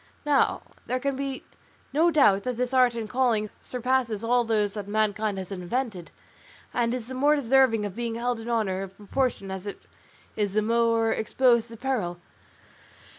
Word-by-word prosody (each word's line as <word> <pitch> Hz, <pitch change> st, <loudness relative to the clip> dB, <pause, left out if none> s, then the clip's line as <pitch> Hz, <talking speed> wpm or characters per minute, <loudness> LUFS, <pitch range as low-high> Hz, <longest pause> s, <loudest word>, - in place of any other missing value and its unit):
Now, 290 Hz, -2 st, +2 dB, 0.2 s
there 255 Hz, -, 0 dB
can 275 Hz, +1 st, -1 dB
be 270 Hz, -1 st, -4 dB, 0.5 s
no 325 Hz, +4 st, +4 dB
doubt 270 Hz, -11 st, +4 dB
that 250 Hz, 0 st, -3 dB
this 250 Hz, +1 st, -1 dB
art 250 Hz, -2 st, +4 dB
and 225 Hz, -2 st, -4 dB
calling 225 Hz, -3 st, +1 dB
surpasses 250 Hz, -3 st, -1 dB
all 245 Hz, +1 st, +3 dB
those 210 Hz, -3 st, +1 dB
that 205 Hz, -2 st, -6 dB
mankind 215 Hz, -1 st, 0 dB
has 190 Hz, 0 st, -6 dB
invented, 195 Hz, 0 st, -3 dB, 0.6 s
and 235 Hz, -1 st, +1 dB
is 245 Hz, -2 st, -3 dB
the 260 Hz, -, -8 dB
more 290 Hz, +4 st, +3 dB
deserving 260 Hz, -5 st, +3 dB
of 200 Hz, -2 st, -6 dB
being 235 Hz, -1 st, -3 dB
held 240 Hz, 0 st, -1 dB
in 225 Hz, +1 st, -7 dB
honour 210 Hz, -5 st, 0 dB
in 195 Hz, -, -5 dB
proportion 205 Hz, +1 st, -2 dB
as 190 Hz, +1 st, -6 dB
it 205 Hz, -, -7 dB, 0.5 s
is 205 Hz, -2 st, -1 dB
the 215 Hz, 0 st, +2 dB
more 230 Hz, 0 st, +2 dB
exposed 235 Hz, +1 st, +2 dB
to 230 Hz, -, -9 dB
peril. 215 Hz, -9 st, -2 dB
230 Hz, 175 wpm, -26 LUFS, 210-255 Hz, 0.6 s, no